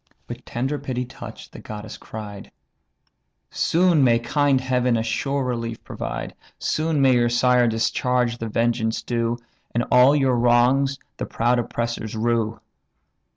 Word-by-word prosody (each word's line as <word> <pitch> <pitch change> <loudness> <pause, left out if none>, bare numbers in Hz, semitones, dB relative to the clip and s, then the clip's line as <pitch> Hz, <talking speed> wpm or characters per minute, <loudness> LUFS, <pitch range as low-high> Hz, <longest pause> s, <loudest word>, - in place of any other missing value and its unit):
With - - -8
tender 135 +5 -2
pity 125 -1 -3
touch'd, 130 - -11
the - - -9
goddess 105 0 -8
cried: 105 -2 -9 1.0
"Soon 170 -3 +3
may 120 -2 +5
kind 135 +3 +2
Heaven 125 -2 +1
a 110 - 0
sure 135 +5 -1
relief 115 -2 -4
provide, - - -5 0.2
Soon 155 -1 0
may 130 -1 +5
your 120 -1 +3
sire 125 0 +3
discharge 120 +1 0
the 115 - -4
vengeance 115 0 0
due, 120 0 -1 0.4
And 120 - +1
all 125 +3 +6
your 135 -4 +2
wrongs 125 +3 +3 0.2
the - - -4
proud 120 +2 +1
oppressors 115 -1 -3
rue! 115 0 0
120 Hz, 140 wpm, -23 LUFS, 115-130 Hz, 1.0 s, all